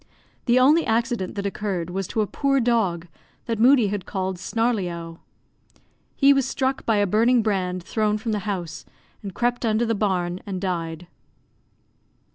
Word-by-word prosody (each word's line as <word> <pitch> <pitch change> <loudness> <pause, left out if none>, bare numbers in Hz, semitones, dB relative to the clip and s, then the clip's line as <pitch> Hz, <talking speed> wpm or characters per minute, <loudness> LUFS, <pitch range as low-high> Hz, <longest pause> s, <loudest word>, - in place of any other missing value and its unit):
The 240 +1 +4
only 300 +6 +5
accident 230 -3 -1
that 200 -1 -3
occurred 190 -4 -3
was 190 0 -3
to 220 - -1
a - - +1
poor 275 +5 0
dog, 220 -9 +1 0.4
that 230 -2 -2
Moodie 245 -3 +5
had 200 -2 -4
called 190 -2 -3
Snarleyowe. 180 -8 -2 1.0
He 280 +1 +6
was 275 -2 +1
struck 265 0 -2
by 225 - +3
a 205 - +3
burning 230 +4 +3
brand 185 -4 -1
thrown 215 +2 0
from 220 +1 -4
the 210 - 0
house, 175 -5 -4 0.4
and 195 -4 -8
crept 240 +1 0
under 225 +1 +1
the 230 - 0
barn 185 -4 -1
and 190 -2 -3
died. 170 -3 -3
210 Hz, 160 wpm, -23 LUFS, 185-235 Hz, 1.0 s, He